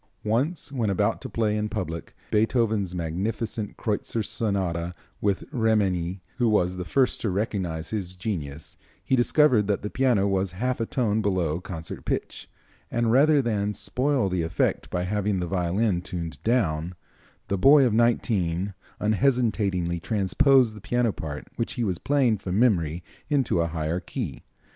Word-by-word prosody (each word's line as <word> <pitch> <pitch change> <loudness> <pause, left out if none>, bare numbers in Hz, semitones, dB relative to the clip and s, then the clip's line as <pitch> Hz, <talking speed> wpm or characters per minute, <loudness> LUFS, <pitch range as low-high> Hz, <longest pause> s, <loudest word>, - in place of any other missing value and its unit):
Once, 135 +9 0
when 120 -6 0
about 95 - +1
to - - -6
play 110 -2 0
in 105 0 -1
public 85 -7 -5 0.2
Beethoven's 110 -4 +1
magnificent 105 +6 -3
Kreutzer 110 +1 -1
Sonata, 90 -6 -2 0.3
with 100 -2 +1
Remenyi, 100 - +1 0.2
who 120 -3 +3
was 90 -4 +2
the 90 - -4
first 130 +6 +1
to 110 - 0
recognize 90 -5 -2
his 95 -4 -3
genius, 80 -7 -5 0.3
he 130 - +3
discovered 120 -3 +4
that 100 -1 0
the 105 - -4
piano 120 -7 +2
was 95 -2 0
half 125 +7 -1
a 115 - -1
tone 110 -4 +1
below 90 -6 0
concert 80 -4 -7
pitch, - - -3 0.4
and 120 -1 +1
rather 145 +3 +5
than 105 -3 -1
spoil 130 -3 0
the 90 -2 0
effect 80 0 0
by 90 - -1
having 105 +1 0
the 90 - -1
violin 90 +2 0
tuned 85 -6 -6
down, 90 -8 0 0.5
the 100 - 0
boy 135 +7 +6
of 120 - +2
nineteen 100 -5 +1 0.3
unhesitatingly 105 -7 +1
transposed 110 - +3
the 105 - -11
piano 120 0 +1
part 75 -2 -6
which 115 - -2
he 120 - -2
was 95 -6 -1
playing 130 -7 +2
from 95 0 -3
memory 85 -8 +2 0.3
into 135 - +2
a 85 - +1
higher 80 +1 -2
key. 90 - -5
105 Hz, 155 wpm, -26 LUFS, 90-115 Hz, 0.5 s, boy